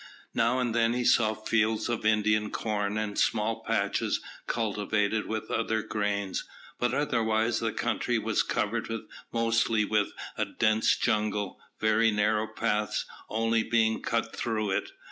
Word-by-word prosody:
Now 120 +2 +2
and 125 -3 0
then 115 0 +3
he 125 0 0
saw 110 -2 +4
fields 110 0 +1
of 120 -2 -1
Indian 105 0 +2
corn, 105 -1 -2
and 105 -1 -2
small 110 0 +1
patches - - 0 0.3
cultivated 105 -1 0
with 110 0 -4
other 110 -1 0
grains, 100 -2 -2 0.4
but 120 -1 +1
otherwise 115 -4 +1
the 115 -1 -1
country 120 +3 0
was 110 0 +1
covered 115 +2 -1 0.4
mostly 115 -1 +2
with 105 -1 +1 0.3
a - - +2
dense 110 0 +2
jungle, 105 -3 0 0.2
very 110 +1 +3
narrow 105 +1 +1
paths 105 -2 -1 0.2
only 115 +1 +1
being 110 -1 +1
cut 115 0 -1
through 110 -3 -1
it. - - -1
110 Hz, 140 wpm, -28 LUFS, 105-115 Hz, 0.4 s, saw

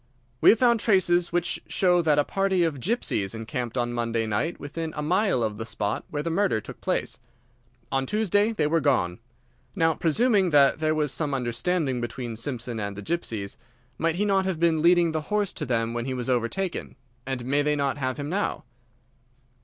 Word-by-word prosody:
"We - - +7
have 230 - +6
found 235 -1 +4
traces 180 -5 +3
which 175 0 -1
show 180 -2 +3
that 155 -3 +2
a 145 - +4
party 195 0 +1
of 155 -5 -1
gypsies 120 - -1
encamped 120 +2 -4
on 120 -1 0
Monday 115 -1 -1
night 110 +11 -2
within 160 +2 -5
a 150 - -2
mile 180 - +2
of 105 -1 -2
the - - -2
spot 105 -2 -3
where 145 -1 -3
the 165 - -2
murder 190 - +1
took 105 - -11
place. - - -1 0.7
On 135 0 0
Tuesday 210 - +2
they 160 -9 0
were 165 +2 +2
gone. 110 - +1 0.6
Now, 165 -3 +3
presuming 195 +4 +2
that 145 -1 +4
there 155 0 +1
was 150 -3 0
some 145 -1 -1
understanding 130 +3 -1
between 120 0 -5
Simpson 120 -1 -4
and 100 -1 -4
these 105 - -7
gypsies, 110 -10 -3 0.4
might 165 0 +1
he 205 +4 0
not 195 -2 +2
have 185 -4 -2
been 165 -2 +2
leading 170 0 +4
the 160 0 -2
horse 210 -2 0
to - - -5
them 115 -1 0
when 120 0 -3
he 130 -1 -2
was 125 0 -2
overtaken, 130 +10 -2 0.3
and 130 -2 -3
may 140 +3 +2
they 150 0 +1
not 140 -1 -1
have 130 -1 -2
him 145 -1 -4
now?" 195 +6 -2
150 Hz, 195 wpm, -26 LUFS, 120-175 Hz, 0.7 s, We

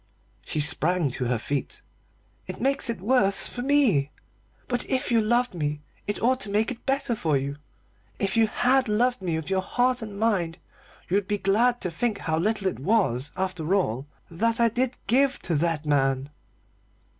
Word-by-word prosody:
She - - -2
sprang 160 +1 +2
to 125 - -3
her 125 0 +1
feet. 140 +5 -4 0.6
"It - - -6
makes 275 -1 +1
it 230 -6 -3
worse 200 -3 +2
for 245 - -6
me! 250 - +3 0.6
But 245 -1 0
if 260 -1 0
you 230 -1 +4
loved 240 +2 +1
me 150 -3 -3 0.2
it 205 - -2
ought 255 +2 +3
to 215 - -3
make 215 +4 +1
it 245 +2 -10
better 270 -2 +1
for 160 -9 +1
you. 140 +1 -4 0.6
If 195 +2 -1
you 225 -1 +4
had 255 +4 +2
loved 240 +2 +1
me 175 -3 -1
with 160 +3 -4
your 190 0 +2
heart 250 +5 +1
and 210 -2 -7
mind 185 -7 0 0.5
you 190 - +2
would 200 -2 -2
be 205 - 0
glad 225 +6 +2
to 180 - -2
think 215 +5 -1
how 160 -4 -1
little 210 +2 0
it 190 - -1
was, 145 - +1
after 185 -2 -1
all, 135 - -1 0.2
that 230 +7 0
I 235 0 +5
did 245 +2 -1
give 270 +5 +3
to 175 - -1
that 160 -1 0
man." 135 -1 +1
200 Hz, 185 wpm, -25 LUFS, 160-240 Hz, 0.6 s, I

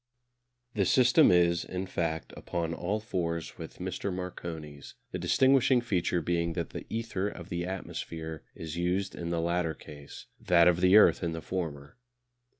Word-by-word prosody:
The 100 -3 +1
system 130 +4 +5
is, 85 -1 +4
in 95 +1 -4
fact, 80 -3 -3
upon 85 -1 -3
all 100 +6 -2
fours 85 -7 -3
with - - -8
Mr. 100 - -3
Marconi's, 80 -5 -7 0.2
the - - -4
distinguishing 130 -1 +4
feature 90 -7 0
being 85 0 0
that 85 -1 -4
the - - -7
ether 110 -4 -2
of 85 -4 -8
the 85 0 -3
atmosphere 80 -4 -6
is 80 0 -6
used 90 +3 0
in 85 -1 -5
the 85 -1 0
latter 85 -1 0
case, 70 -2 -11
that 85 -1 +4
of 90 0 +3
the 95 +3 +7
earth 110 - +6
in 85 -2 -1
the 80 - -4
former. 75 -5 -5
85 Hz, 160 wpm, -29 LUFS, 85-95 Hz, 0.2 s, the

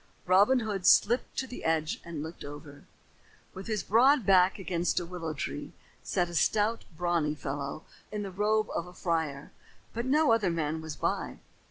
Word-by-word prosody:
Robin 200 +8 +5
Hood 200 -5 -2
slipped 240 +4 +4
to 265 - 0
the 250 - -9
edge 160 -1 0
and 165 -3 -6
looked 160 +2 -8
over. 145 0 -10 0.7
With 190 +1 -8
his 215 -2 -1
broad 250 +3 +4
back 185 -1 +5
against 180 -3 -1
a 175 - -5
willow 165 -3 -5
tree, - - -5 0.3
sat 175 - 0
a 175 - -9
stout, 215 +6 +1
brawny 170 -4 0
fellow 140 +1 -5 0.3
in 210 -1 -3
the 195 - -6
robe 215 +3 +1
of 170 - -3
a 180 - -12
friar, 160 -5 -2 0.4
but 235 +2 -3
no 300 0 +4
other 220 -5 +3
man 160 -1 -2
was 160 -1 -6
by. - - -2
180 Hz, 175 wpm, -29 LUFS, 160-215 Hz, 0.7 s, Robin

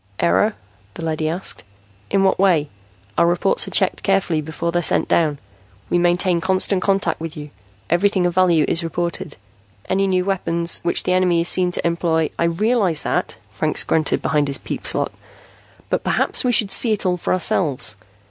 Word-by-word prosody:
"Error?" 85 +2 +2 0.4
the 165 - -6
leady 155 -1 -1
asked. 175 +4 -3 0.5
"In 195 - +2
what 190 - +2
way? 175 -7 +3 0.5
Our 170 - +4
reports 175 - +2
are - - -4
checked - - +1
carefully 190 -5 +1
before 160 +2 -4
they're 175 0 0
sent - - +1
down. 155 -4 +1 0.5
We 175 - +3
maintain 175 0 +2
constant 190 +1 +1
contact 195 -3 0
with 165 0 -6
you; 150 -1 -8 0.4
everything 185 +2 +1
of 175 - 0
value 175 -4 +3
is 165 - 0
reported. 170 -2 -4 0.5
Any 195 +1 +1
new 185 -1 +1
weapons 170 -3 0
which 170 - 0
the 180 - 0
enemy 180 -2 +2
is 170 - 0
seen 180 -1 +1
to - - -4
employ 170 -2 0
" - - -33
"I 170 - +2
realize 185 -1 +1
that," - - -2 0.2
Franks - - +1
grunted 155 -2 0
behind 150 -2 +1
his 140 - +1
peep - - -5
slot. - - -1 0.8
"But - - 0
perhaps - - +1
we 250 - +2
should 210 -4 +3
see 225 +1 +1
it 210 - -3
all 180 -1 +1
for - - -3
ourselves. 150 - +1
175 Hz, 185 wpm, -20 LUFS, 160-185 Hz, 0.8 s, Our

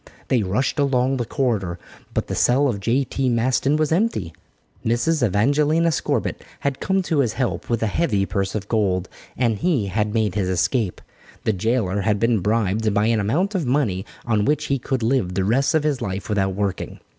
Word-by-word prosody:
They 125 -3 +3
rushed 105 +10 -1
along 135 -1 +2
the 120 - -2
corridor 105 -10 -1 0.4
but - - 0
the - - -5
cell 135 +4 +3
of 110 -6 -1
J.T. 130 +4 0
Maston 125 +4 +2
was 155 -1 0
empty. 165 - 0 0.5
Mrs. 120 +6 +1
Evangelina 145 - +2
Scorbitt 150 - -1 0.2
had 140 -1 -1
come 190 0 0
to 160 -4 0
his 120 -6 +1
help 125 -1 -2
with 115 -1 0
a - - +3
heavy 105 - +1
purse 100 0 -2
of 105 -1 -3
gold, 95 -5 0 0.3
and 115 -4 +1
he 155 - +1
had 105 +2 -1
made 110 -3 0
his 95 -2 -1
escape. 95 +2 0 0.4
The 110 - +1
jailer 100 -1 0
had 105 0 +1
been 115 -1 +2
bribed 110 +1 +1
by 105 +1 +3
an 115 -1 +2
amount 160 - 0
of 175 -9 -1
money 120 -9 +1 0.2
on 110 -3 +1
which 150 +1 +1
he 135 - 0
could 130 -1 -2
live 115 -7 +1
the 95 - +1
rest 135 +8 +2
of 155 - +2
his 150 -4 0
life 95 +2 -4
without 95 -2 0
working. 100 -1 -3
115 Hz, 190 wpm, -22 LUFS, 100-135 Hz, 0.5 s, They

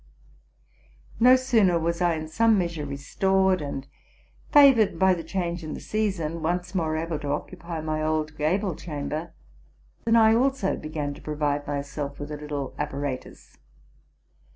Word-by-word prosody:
No 250 +2 +7
sooner 225 -9 +3
was 170 +1 -1
I 175 -2 +3
in 155 0 -5
some 225 +7 +3
measure 170 -5 -2
restored, 190 +6 +1
and, 140 -2 -5 0.7
favored 265 - +6
by 190 +1 +4
che 175 - -3
change 175 0 -3
in 155 - -5
the - - -7
season, 185 -7 -2
once 175 +3 -2
more 160 -4 0
able 160 -1 -3
to 145 - -6
occupy 170 +3 -4
my 155 0 -2
ose 155 0 0
gable 175 +6 0
chamber, 155 +1 -5 0.7
than 230 - +3
I 220 -1 +6
also 255 -4 +1
began 155 -2 -4
to - - -13
provide 145 -1 -2
myself 140 0 -4
with: 145 +1 -6
little 150 -2 -5
apparatus. 145 -2 -5
165 Hz, 145 wpm, -25 LUFS, 150-190 Hz, 0.7 s, No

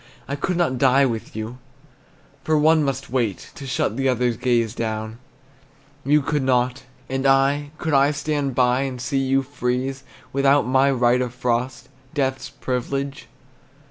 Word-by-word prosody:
I 140 - -2
could 175 +5 -2
not 130 -8 +1
die 135 +1 +5
with 115 -5 -4
you, 110 +3 -6 0.8
For 155 0 +2
one 155 +1 +4
must 135 -1 -3
wait 115 -7 -2
To 140 - -9
shut 115 -3 -1
the 135 0 +1
other's 125 -1 +1
gaze 115 -2 +1
down, 110 0 -4 0.8
You 150 +1 +3
could 150 +1 0
not. 130 0 0 0.2
And 135 +1 -1
I, 135 +2 +3
could 160 -2 -2
I 140 +1 +5
stand 145 -2 -2
by 125 0 +3
And 130 -2 -3
see 130 +3 -1
you 135 0 +1
freeze, 130 0 -2 0.3
Without 140 +1 +3
my 130 +2 +3
right 125 -1 +3
of 125 -1 -3
frost, 125 0 -2 0.3
Death's 135 -2 -1
privilege? 135 +2 -4
130 Hz, 155 wpm, -22 LUFS, 125-140 Hz, 0.8 s, die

